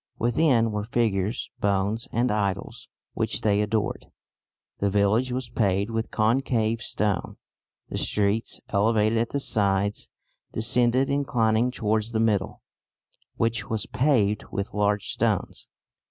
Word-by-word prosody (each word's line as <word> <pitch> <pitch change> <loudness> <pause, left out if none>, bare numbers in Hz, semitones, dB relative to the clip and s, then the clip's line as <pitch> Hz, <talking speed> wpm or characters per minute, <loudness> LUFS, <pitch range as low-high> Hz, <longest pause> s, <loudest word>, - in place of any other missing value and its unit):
Within 120 -1 +2
were 105 0 -2
figures, 110 -2 -1
bones, 100 +3 0
and 120 +2 +1
idols 100 -2 -2 0.3
which - - -1
they 105 -1 +2
adored.... 105 0 -2 0.7
The 100 - +1
village 105 +5 +2
was 125 0 -3
paved 100 -2 0
with 115 0 -2
concave 115 0 +1
stone. 105 -6 -1 0.5
The - - -3
streets, 105 +2 0
elevated 110 +2 +2
at 115 - 0
the 140 - -2
sides, 100 -4 0 0.4
descended, 120 +3 +3
inclining 120 -4 +1
towards 110 -2 -1
the 110 - +1
middle, 105 -4 0 0.7
which 115 0 -1
was 110 -1 -1
paved 115 -7 +1
with 100 +1 -4
large 105 0 +1
stones. - - -1
110 Hz, 125 wpm, -25 LUFS, 105-120 Hz, 0.7 s, descended